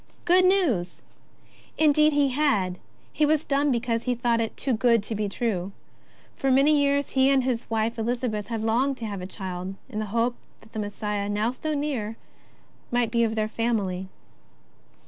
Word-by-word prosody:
Good 365 +1 +5
news! 295 - +1 0.7
Indeed 305 0 +4
he 285 -1 +3
had; 215 -11 +1 0.3
he 305 - 0
was 305 0 +2
dumb 285 +1 +1
because 235 -2 0
he 250 - 0
had 240 - -8
thought 235 -1 +2
it 225 - -3
too 265 - 0
good 230 -1 +3
to 220 - -4
be 210 -1 -2
true. 195 -3 -2 0.6
For 270 - -1
many 275 +4 +5
years 285 -1 +1
he 265 0 +4
and 270 -2 +3
his 250 -2 -2
wife 225 +1 -1
Elizabeth 225 -2 -2
had 225 -2 -3
longed 255 +5 +1
to 230 - -5
have 200 -3 -5
a 180 - -5
child, 185 -1 -5
in 215 -4 -4
the 215 - -2
hope 230 +4 +1 0.3
that 220 - -20
the 220 - -4
Messiah, 205 0 -3
now 210 +3 0
so 305 +4 -3
near, 250 -7 -2 0.7
might 240 -2 +1
be 235 0 +2
of 225 -1 0
their 215 -1 0
family. 210 -5 -1
230 Hz, 185 wpm, -25 LUFS, 210-275 Hz, 0.7 s, Good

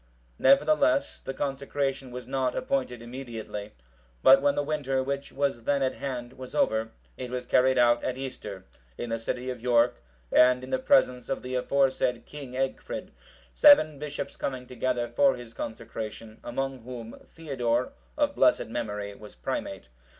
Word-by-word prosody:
Nevertheless, 285 +1 +4
the - - -5
consecration 135 -1 -2
was 125 0 -7
not 130 0 -1
appointed 125 -3 -2
immediately; 115 -4 -7 0.5
but 135 +1 +8
when 145 0 +3
the 145 - +1
winter, 140 -3 -1
which 140 +1 -3
was 135 -4 -1
then 140 -1 +2
at 130 - +1
hand, 125 -3 -5
was 130 -1 -9
over, 110 0 +2 0.3
it 125 - -5
was 125 0 -4
carried 130 +1 +3
out 120 -1 +4
at 130 - -2
Easter,(753) 105 -8 -6 0.3
in 120 - -4
the 115 - -1
city 125 +3 -3
of 125 -2 -8
York, 120 - +3 0.3
and 125 0 +5
in 130 - -8
the - - +1
presence 125 - +3
of 135 - -2
the 125 0 -5
aforesaid 130 -1 +1
King 140 -4 -9
Egfrid; 135 - -3 0.4
seven 155 - +7
bishops 145 -1 -5
coming 130 -2 -4
together 125 -1 -1
for 135 +4 +3
his 120 -2 -10
consecration, 110 -1 -6
among 135 +2 -3
whom, 115 -1 -8
Theodore, 125 -6 -2 0.2
of 290 -1 +2
blessed 125 - +3
memory, 105 -3 -4
was 105 +1 -13
Primate. - - -4
130 Hz, 155 wpm, -28 LUFS, 120-135 Hz, 0.5 s, but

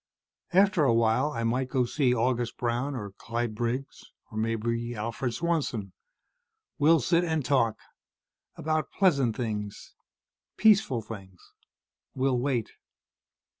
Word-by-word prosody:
After 190 -2 +4
a 120 -5 +4
while 115 +5 +3
I 115 -6 -3
might 125 +3 0
go 130 -2 +1
see 130 +1 +1
August 120 -1 0
Brown 125 +4 -1
or 105 -5 -5
Clyde 115 +3 -3
Briggs 120 +4 -3 0.3
or 110 - -7
maybe 115 +1 -1
Alfred 115 +3 -3
Swanson. 150 - -1 0.9
We'll 160 +3 +5
sit 170 +7 +2
and 160 -5 -1
talk, 115 -6 +2 0.8
about 155 0 -1
pleasant 140 - +2
things, 105 -4 -4 0.6
peaceful 195 - +4
things. 95 -4 -10 0.8
We'll 130 -1 +1
wait." 125 -4 -1
120 Hz, 120 wpm, -28 LUFS, 115-145 Hz, 0.9 s, We'll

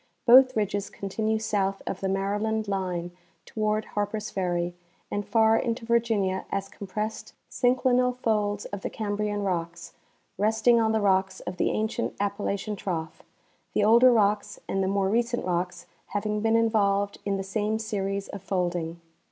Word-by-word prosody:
Both 255 +1 +7
ridges 205 -1 -1
con 200 - -7
tinue 220 +2 0
south 195 -3 -1
of 190 - -4
the 190 - -1
Maryland 205 +3 -1
line 180 -3 -2 0.3
toAvard 215 0 -1
Harpers 210 +1 -2
Ferry 175 -2 -1 0.4
and 205 - -1
far 220 +1 +4
into 230 0 -1
Virginia 225 -5 +1
as 195 0 -2
compressed 210 +2 -5 0.2
synclinal 250 0 +2
folds 210 -4 0
of 200 -1 -6
the - - -3
Cambrian 205 -1 -2
rocks, 170 -3 -3 0.5
resting 220 +3 +4
on 220 -1 +2
the 220 -1 +1
rocks 190 -1 +2
of 180 - -6
the - - +2
ancient 220 +2 -2
Appalachian 200 +1 -2
trough, 165 -5 -4 0.5
the 210 - +3
older 235 +4 +7
rocks 210 -2 +1
and 195 - 0
the 190 - +1
more 195 0 +1
recent 235 +2 0
rocks 180 0 -2 0.2
having 210 +1 -2
been 225 +1 +2
involved 205 -3 +2
in 200 -1 -1
the 195 - -3
same 210 +2 -1
series 200 -2 -3
of 200 - -7
folding. 175 -3 -2
205 Hz, 155 wpm, -27 LUFS, 195-220 Hz, 0.5 s, Both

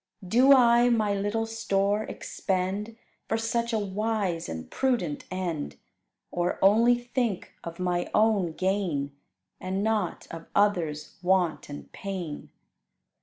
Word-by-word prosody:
Do 250 +8 +5
I 240 -2 +6
my 215 -4 +2
little 205 +3 -1
store 210 -2 0
expend 195 +4 -3 0.3
For 225 - 0
such 235 +1 -1
a 225 - +1
wise 205 -3 -2
and 80 0 -6
prudent 235 - -1
end; 180 -5 -3 0.6
Or 175 0 -1
only 225 +5 +5
think 240 -4 -2
of 170 0 -7
my 180 -1 -1
own 210 -6 +2
gain, 175 -7 -1 0.4
And 190 +2 -2
not 215 -5 -1
of 165 0 -8
others' 175 -7 +1
want 180 -4 +1
and 145 - -9
pain? 185 -6 -6
200 Hz, 120 wpm, -27 LUFS, 175-225 Hz, 0.6 s, I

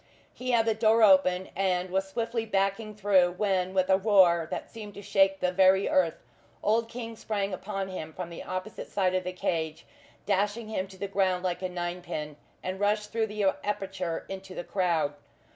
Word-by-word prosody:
He 255 +1 -6
had 235 -2 +3
the 225 - +3
door 220 +1 +4
open, 185 -2 +5
and 185 -1 0
was 190 +1 0
swiftly 230 +2 -2
backing 210 +1 -1
through, 190 -4 +3
when, 190 -1 0
with 185 -1 +3
a 190 0 +4
roar 185 -5 +5
that - - -4
seemed 210 -3 -10
to 200 - -9
shake 195 -1 +3
the 180 - +2
very 190 +1 +4
earth, 175 -3 +1 0.4
old 225 +2 +2
King 230 -1 -6
sprang 200 -3 -2
upon 195 +1 -4
him 160 -4 -6
from 175 +1 -6
the 170 - -7
opposite 185 +3 -6
side 185 -2 +1
of 185 0 0
the 180 - -3
cage, 160 -3 -2 0.4
dashing 205 +3 0
him 195 -3 -2
to 190 0 -14
the 200 +2 -3
ground 190 -2 +1
like 180 -1 -2
a 185 - -2
ninepin, 175 -4 -4 0.3
and 185 +1 -4
rushed 210 +1 0
through 225 -1 0
the 210 0 -3 0.2
aperture 190 -4 -3
into 190 -1 -8
the - - -4
crowd. 170 -7 0
190 Hz, 190 wpm, -28 LUFS, 180-210 Hz, 0.4 s, open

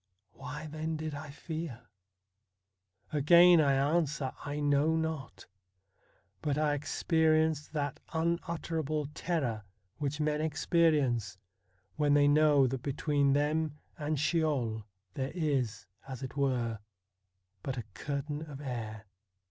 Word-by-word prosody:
Why 150 +1 -7
then 155 +1 -3
did 155 0 -4
I 145 +1 -7
fear? 155 -4 -6 1.3
Again 170 +3 +7
I 140 -2 +3
answer, 145 -1 +1
I 145 +1 -3
know 145 +2 +3
not. 155 - -3 1.0
But 145 -1 0
I 150 -1 +2
experienced 155 +1 +1
that 145 -3 -2
unutterable 165 -2 -1
terror 135 - -2 0.4
which 145 0 -2
men 150 0 0
experience 145 - +1 0.6
when 145 -1 +3
they 145 0 +5
know 145 -1 +5
that 130 0 -2
between 140 0 +1
them 150 +1 0 0.2
and 150 -1 -2
Sheol 140 -9 0 0.3
there 135 +1 -3
is, 135 - -1 0.2
as 130 -1 -6
it 130 - -6
were, 125 -6 0 0.8
but 135 +3 -4
a 120 - -3
curtain 145 +5 -4
of 140 -2 -8
air. 115 -6 -5
145 Hz, 115 wpm, -31 LUFS, 135-155 Hz, 1.3 s, Again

